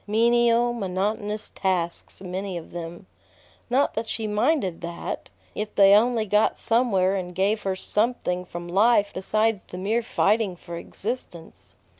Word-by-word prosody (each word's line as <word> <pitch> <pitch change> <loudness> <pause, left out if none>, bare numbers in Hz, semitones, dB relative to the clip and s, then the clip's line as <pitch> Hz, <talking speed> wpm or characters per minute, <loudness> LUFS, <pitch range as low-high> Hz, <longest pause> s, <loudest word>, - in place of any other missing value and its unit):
Menial, 235 +2 +3
monotonous 210 +1 -2
tasks 180 -1 -2
many 185 0 -4
of 165 - -9
them. 170 +2 -7 0.6
Not 265 +4 +2
that 220 +1 -3
she 225 0 -3
minded 210 - 0
that, 170 0 -5 0.2
if 210 0 -5
they 195 0 +7
only 225 +1 +4
got 210 +1 +2
somewhere 215 -6 +2
and 180 -2 -4
gave 205 +4 +1
her 190 -1 -1
something 210 -3 -1
from 175 -1 -8
life 205 +3 +3
besides 215 +2 0
the 180 - -10
mere 210 +6 0
fighting 215 -3 +1
for 170 0 -9
existence. 175 -2 -7
205 Hz, 140 wpm, -25 LUFS, 185-225 Hz, 0.6 s, they